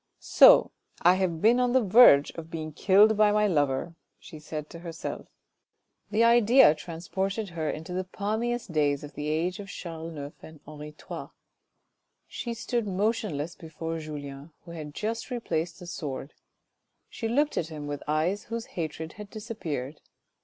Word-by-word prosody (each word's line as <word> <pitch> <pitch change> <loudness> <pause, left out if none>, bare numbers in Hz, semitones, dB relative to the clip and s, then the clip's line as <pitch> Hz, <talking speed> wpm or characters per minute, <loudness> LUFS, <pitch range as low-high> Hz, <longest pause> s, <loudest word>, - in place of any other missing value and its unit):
" - - -51 0.2
So - - +9 0.3
I 175 - +7
have 185 -4 -1
been 235 +3 +5
on 250 -1 +2
the 260 -2 +4
verge 190 -9 +7
of 165 -1 -9
being 155 -1 -5
killed 205 +6 +5
by 210 0 +4
my 210 0 +3
lover," 145 -3 0 0.2
she 160 -5 -12
said 150 0 -6
to 170 - -9
herself. 165 -1 -6 0.8
This 215 +2 +2
idea 235 - +6
transported 190 +6 -4
her 160 -3 -3
into 160 +3 -5
the 185 +1 -1
palmiest 220 +3 -3
days 145 -3 +1
of 145 - -9
the 150 - -5
age 170 +5 -1
of 200 - -7
Charles 165 -3 -7
IX. 145 0 -7
and 160 -1 -13
of - - -33
Henri 150 0 -9
III. - - -7 1.0
She 235 -1 -5
stood 235 -1 -2
motionless 190 -6 -1
before 165 0 -6
Julien, 145 -1 -8
who 170 - -10
had 155 -3 -8
just 225 +4 -3
replaced 170 -9 -3
the 180 - -11
sword; 145 -5 -6 0.7
she 225 - -5
looked 290 +6 +1
at 165 - -1
him 155 -2 -7
with 145 -1 -5
eyes 160 +7 0
whose 230 0 -5
hatred 160 -1 -5
had 210 -1 -10
disappeared. 165 - -6
170 Hz, 165 wpm, -27 LUFS, 155-215 Hz, 1.0 s, So